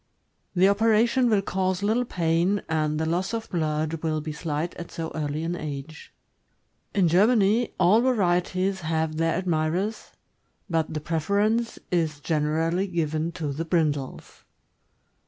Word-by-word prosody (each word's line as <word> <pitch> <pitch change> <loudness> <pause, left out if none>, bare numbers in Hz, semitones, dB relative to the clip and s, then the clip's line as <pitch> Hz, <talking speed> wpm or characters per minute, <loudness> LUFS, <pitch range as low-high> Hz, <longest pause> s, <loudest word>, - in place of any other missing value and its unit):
The 185 +2 +5
operation 225 +4 +3
will 205 -3 +2
cause 185 0 -1
little 225 +4 +1
pain, 175 +1 +1
and 155 -1 0
the 160 - 0
loss 180 +7 -1
of 225 -1 -6
blood 155 -1 -1
will 155 -1 -1
be 155 +1 -5
slight 155 +2 -3
at 170 - -7
so 165 -2 -5
early 150 0 -3
an 170 +1 -2
age. 150 -1 -7 0.8
In 190 -4 +4
Germany, 210 +5 +3
all 190 +5 +5
varieties 190 -5 +1
have 160 -1 -1
their 165 0 +1
admirers, 180 +4 -1 0.6
but 165 -4 0
the 155 - -2
preference 200 +9 0
is 160 -4 0
generally 160 +5 0
given 160 -2 -1
to 155 -5 -3
the 155 +4 -3
brindles. 155 -5 -2
170 Hz, 140 wpm, -25 LUFS, 155-195 Hz, 0.8 s, The